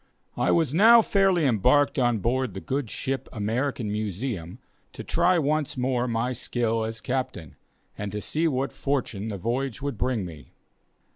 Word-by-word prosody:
I - - 0
was 160 -5 +2
now 225 +6 +7
fairly 195 -6 +3
embarked 140 - +3
on 120 -2 +2
board 120 0 -1
the - - -4
good 135 +6 -2
old - - -14
ship 135 +3 -3
American 115 +2 -2
Museum, 105 -3 -4 0.4
to - - -7
try 175 +2 +2
once 150 -2 0
more 125 -1 0
my 120 +2 -1
skill 115 -2 -1
as 110 0 -4
captain, 125 - -3 0.4
and 100 -1 -4
to 105 - -3
see 160 +9 0
what 135 -2 -1
fortune 125 -7 -2
the 105 -3 -4
voyage 120 +5 -2
would 140 -6 -4
bring 125 -6 0
me. 80 -4 -11
125 Hz, 165 wpm, -26 LUFS, 110-140 Hz, 0.4 s, now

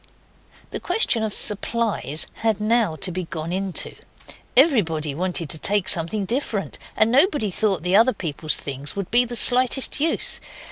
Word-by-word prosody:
The - - -4
question 355 - 0
of 220 -1 -2
supplies 210 - -1
had 220 -2 -1
now 215 -5 +1
to 185 +3 -2
be 180 0 -4
gone 160 +1 -5
into. 190 -1 -2 0.6
Everybody 170 - +3
wanted 175 +1 -2
to 160 - -1
take 200 +4 0
something 185 +5 0
different, 225 -2 -3 0.2
and 220 +1 +3
nobody 275 - +2
thought 195 -3 0
the 180 +2 +1
other 230 +5 +5
people's 155 -2 -1
things 140 +1 -5
would 200 -2 -5
be 245 +1 +5
the 240 0 -6
slightest 255 +3 +3
use. 315 +2 -1
205 Hz, 155 wpm, -22 LUFS, 170-235 Hz, 0.6 s, other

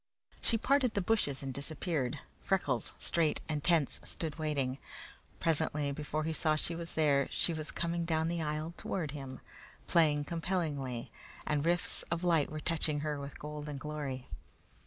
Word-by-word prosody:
She 230 - +3
parted 260 0 +3
the - - +3
bushes 175 -10 +1
and 135 -1 -3
disappeared. 145 -1 -1 0.2
Freckles, 145 -11 +1
straight 165 -3 +2
and 150 -2 -1
tense, 165 -5 +3
stood 160 -1 -1
waiting. 140 -4 0 0.6
Presently, 150 -2 +2
before 150 +2 -2
he 160 +1 0
saw 155 -1 +3
she 160 +2 -1
was 170 0 -5
there, 145 -3 +4
she 170 - +1
was 155 -1 -2
coming 170 0 -1
down 160 -1 +1
the 170 0 0
aisle 155 +2 -2
toward 160 -7 -2
him, 135 -3 -7 0.4
playing 150 -3 +4
compellingly, 150 -7 -2 0.3
and 150 -1 +1
rifts 175 +1 +1
of 170 +1 -1
light 165 -5 +4
were 155 - -4
touching 155 -2 0
her 150 -1 -1
with 140 0 -6
golden 150 -1 -5
glory. 140 -3 -4
155 Hz, 155 wpm, -33 LUFS, 145-170 Hz, 0.6 s, there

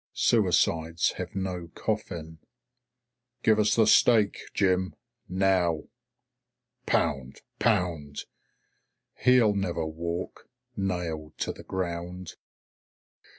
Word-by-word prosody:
Suicides 85 +1 +2
have - - -6
no 90 -3 -3
coffin. 85 -7 -4 1.0
"Give 110 -1 +4
us 105 0 +3
the 115 - +5
stake, 110 -1 +4
Jim. 95 -1 +1 0.3
Now." 90 -3 +2 1.0
Pound! 65 -2 0 0.2
Pound! 80 -5 0 0.9
"He'll 125 -4 +5
never 90 -5 -1
walk. 85 +2 -5 0.3
Nailed 85 -5 -3
to - - -2
the - - -12
ground." 90 -1 -4
90 Hz, 85 wpm, -27 LUFS, 80-95 Hz, 1.0 s, the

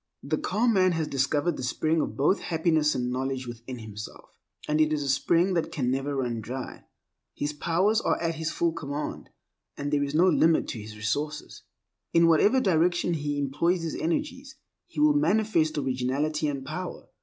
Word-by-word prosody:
The - - -1
calm 230 +2 +1
man 185 -2 +4
has 160 -2 -1
discovered 145 +5 0
the - - -5
spring 155 +5 +1
of - - -4
both 150 +8 +3
happiness 160 -2 +1
and 125 -1 -1
knowledge 130 0 -2
within 120 +1 -8
himself, 105 -2 -9 0.4
and 150 +1 +2
it 155 0 +3
is 150 -1 0
a - - -4
spring 170 +7 +2
than 170 -2 0
can 125 -4 -1
never 135 +2 -1
run 120 -4 -2
dry. 125 +4 -7 0.5
His 145 +1 -2
powers 180 +9 +1
are - - 0
at 165 0 -1
his 160 0 -3
full 170 -1 0
command, 145 -2 -5 0.5
and 145 +1 -3
there 145 - +3
is 140 +1 -3
no 175 +4 +5
limit 165 -3 +3
to 115 - -5
his 105 0 -9
resources. 145 +9 -3 0.5
In 170 0 +5
whatever 165 +10 +5
direction 175 -4 +2
he 145 -2 -2
employs 155 +6 0
his 165 - -3
energies, 265 - -3 0.3
he 335 - -7
will 300 0 +5
manifest 215 - +2
originality 140 +3 -1
and 140 -2 -3
power. - - -6
155 Hz, 180 wpm, -27 LUFS, 135-170 Hz, 0.5 s, no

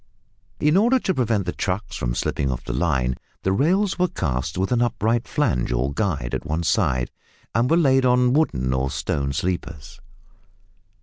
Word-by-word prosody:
In 150 +4 +3
order 240 +6 +4
to 195 -6 -1
prevent 115 - 0
the 90 - -1
trucks 95 +5 -3
from - - -2
slipping 70 - -1
off 60 -2 -3
the 65 - -3
line 65 -4 0 0.3
the 95 - +1
rails 185 - +1
were 180 - +3
cast 70 - -3
with 95 +4 -1
an 120 -1 +2
upright 115 0 0
flange 70 - 0
or 65 +3 0
guide 75 - -2
at - - -2
one 80 +2 -2
side, 65 -6 +1 0.4
and 120 +2 +2
were 165 - +4
laid 135 -5 +4
on 125 0 +3
wooden 65 - +1
or 65 +1 0
stone 70 0 -2
sleepers. 80 -2 -4
95 Hz, 175 wpm, -23 LUFS, -, 0.4 s, order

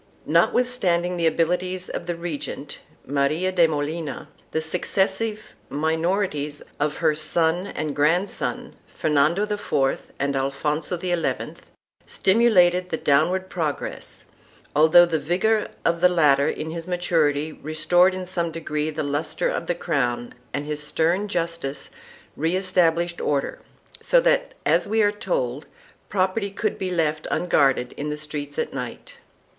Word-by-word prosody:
1 - - -4
Notwith 250 - +4
standing 180 -8 0
the 170 -2 +1
abilities 180 +3 0
of 170 - -5
the 175 - -1
regent, 150 -4 -5 0.3
Maria 145 +7 0
de 175 -3 +4
Molina, 155 0 -4 0.2
the 160 - -1
suc 160 +3 -2
cessive 210 +3 +1 0.3
minorities 160 -1 -1 0.2
of 150 0 0
her 160 -2 +2
son 160 +4 0
and 155 -6 -4
grandson, 165 +7 0 0.2
Fernando 155 +6 +2
IV 205 -10 -1
and 140 0 -1
Alfonso 150 +5 -1
XI, 175 -1 -2 0.5
stimulated 185 -4 +3
the 160 - -1
downward 165 +7 +2
progress, 160 -6 -4 0.5
although 160 +3 +7
the 165 -2 -1
vigor 190 +9 +1 0.2
of 170 0 +1
the 180 - +6
latter 145 -5 +4
in 160 +1 -4
his 165 +1 -6
maturity 160 -4 +1
restored 175 +5 +2
in 185 -1 -5
some 175 -2 -2
degree 155 -2 -3
the 155 0 -3
lustre 145 +2 -1
of 170 - -3
the 175 - 0
crown 120 -8 -1 0.2
and 145 +1 -3
his 150 0 -3
stern 165 +6 0
justice 165 -7 -3 0.4
re 165 +4 0
established 175 -2 +1
order, 140 -2 -1 0.4
so - - +4
that, - - +1
as - - +3
we 220 +1 +2
are 205 - +4
told, 150 -10 -2 0.4
property 200 +2 0
could 205 +1 -2
be 190 - -2
left 155 -3 -1
unguarded 135 -7 +2
in 150 +1 -3
the 150 - -3
streets 150 -1 -5
at - - -2
night. 125 -3 -7
165 Hz, 140 wpm, -23 LUFS, 150-180 Hz, 0.5 s, although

